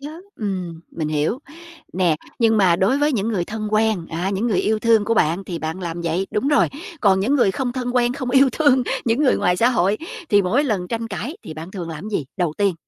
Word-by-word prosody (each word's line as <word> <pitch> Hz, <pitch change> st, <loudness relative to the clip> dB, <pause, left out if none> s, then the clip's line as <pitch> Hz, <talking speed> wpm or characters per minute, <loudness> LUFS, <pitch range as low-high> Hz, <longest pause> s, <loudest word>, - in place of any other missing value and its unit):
chớ, 290 Hz, +2 st, -7 dB, 0.3 s
ừm, 185 Hz, -6 st, -4 dB
mình 155 Hz, -2 st, -3 dB
hiểu. 155 Hz, -, 0 dB, 0.5 s
Nè, 175 Hz, -4 st, +2 dB, 0.2 s
nhưng 225 Hz, -2 st, +3 dB
mà 185 Hz, -5 st, +4 dB
đối 210 Hz, +10 st, +2 dB
với 295 Hz, +1 st, +2 dB
những 220 Hz, -3 st, 0 dB
người 190 Hz, -6 st, 0 dB
thân 215 Hz, +2 st, -5 dB
quen 215 Hz, -5 st, +1 dB
á, 170 Hz, +4 st, -2 dB
những 200 Hz, +4 st, -1 dB
người 210 Hz, -6 st, +1 dB
yêu 215 Hz, 0 st, +1 dB
thương 225 Hz, -2 st, +3 dB
của 230 Hz, +2 st, +1 dB
bạn, 175 Hz, -2 st, +1 dB
thì 175 Hz, -3 st, -5 dB
bạn 160 Hz, +3 st, -4 dB
làm 170 Hz, -1 st, -4 dB
vậy, 170 Hz, +3 st, -1 dB
đúng 260 Hz, +7 st, 0 dB
rồi. 295 Hz, -, +4 dB, 0.3 s
Còn 190 Hz, -3 st, +4 dB
những 240 Hz, +9 st, +1 dB
người 245 Hz, -8 st, +4 dB
không 245 Hz, +5 st, -2 dB
thân 250 Hz, -1 st, -3 dB
quen, 245 Hz, -1 st, +2 dB
không 260 Hz, -1 st, -4 dB
yêu 270 Hz, +1 st, +5 dB
thương, 280 Hz, -5 st, +3 dB, 0.2 s
những 235 Hz, +5 st, +1 dB
người 270 Hz, -, +4 dB
ngoài 180 Hz, 0 st, +1 dB
xã 230 Hz, +5 st, +4 dB
hội, 205 Hz, -4 st, +1 dB, 0.3 s
thì 205 Hz, -1 st, +4 dB
mỗi 230 Hz, +11 st, +1 dB
lần 200 Hz, -9 st, -1 dB
tranh 230 Hz, 0 st, -3 dB
cãi 220 Hz, -, -5 dB
thì -, -, -8 dB
bạn 160 Hz, +3 st, -8 dB
thường 180 Hz, -4 st, -6 dB
làm 155 Hz, -1 st, -7 dB
cái 210 Hz, -, 0 dB
gì 140 Hz, -, -10 dB
đầu 175 Hz, -4 st, 0 dB
tiên? 200 Hz, -3 st, +2 dB
205 Hz, 245 wpm, -21 LUFS, 175-240 Hz, 0.5 s, yêu